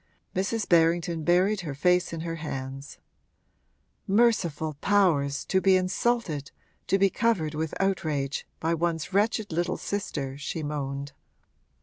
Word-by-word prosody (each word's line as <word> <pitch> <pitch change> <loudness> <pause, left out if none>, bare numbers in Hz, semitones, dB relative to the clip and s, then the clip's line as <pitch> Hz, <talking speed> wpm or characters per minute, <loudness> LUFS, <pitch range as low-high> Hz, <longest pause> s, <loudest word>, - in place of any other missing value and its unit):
Mrs. 200 +4 -1
Berrington 165 -1 +3
buried 185 +5 +3
her 150 -5 -5
face 180 +4 +2
in 165 -1 -4
her 165 0 -4
hands. 135 -2 -6 1.1
'Merciful 190 -8 +2
powers, 165 -9 +2
to 190 - +1
be 190 -1 +5
insulted, 185 - 0 0.4
to 195 - +3
be 195 -1 +3
covered 190 -10 +1
with 155 +1 -3
outrage, 155 -8 -1
by 165 +1 0
one's 165 +1 -1
wretched 210 0 +1
little 170 +2 -1
sister!' 140 -9 -4
she 155 +2 -4
moaned. 140 -1 -4
170 Hz, 125 wpm, -27 LUFS, 150-195 Hz, 1.1 s, be